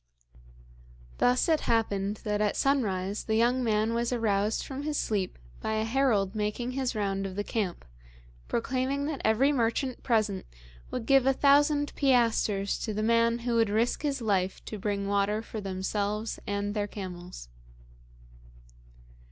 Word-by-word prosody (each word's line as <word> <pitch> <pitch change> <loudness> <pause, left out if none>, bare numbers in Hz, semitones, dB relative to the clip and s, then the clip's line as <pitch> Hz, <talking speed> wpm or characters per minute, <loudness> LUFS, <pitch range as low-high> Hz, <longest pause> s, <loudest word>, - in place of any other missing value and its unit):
Thus 250 +1 +3
it 320 -2 +3
happened 205 -3 0
that 210 0 -1
at 210 -1 +1
sunrise 205 -8 0
the 220 - 0
young 245 +3 +3
man 220 0 +1
was 235 +1 0
aroused 215 -3 +1
from 270 0 -5
his 295 0 -2
sleep 200 -4 -1 0.2
by 220 - -2
a 220 0 0
herald 225 -5 +1
making 215 +3 -2
his 260 -2 -2
round 195 -2 -1
of 185 - -8
the 205 - -1
camp, 205 - -3 0.6
proclaiming 260 +4 -1
that 295 -2 -3
every 235 +6 +3
merchant 250 0 0
present 215 -5 0 0.4
would 245 - -4
give 270 0 +4
a 270 - +5
thousand 290 +2 +3
piastres 230 -7 +2
to 215 -3 -3
the 215 - -1
man 230 +1 +3
who 240 - 0
would 225 -2 +3
risk 225 +4 +1
his 280 -4 -2
life 190 -3 0
to 215 - -6
bring 200 0 -2
water 205 +2 +1
for 220 -1 -6
themselves 205 +3 -2
and 205 0 -2
their 205 -1 -1
camels. 180 - -8
220 Hz, 150 wpm, -28 LUFS, 205-250 Hz, 0.6 s, a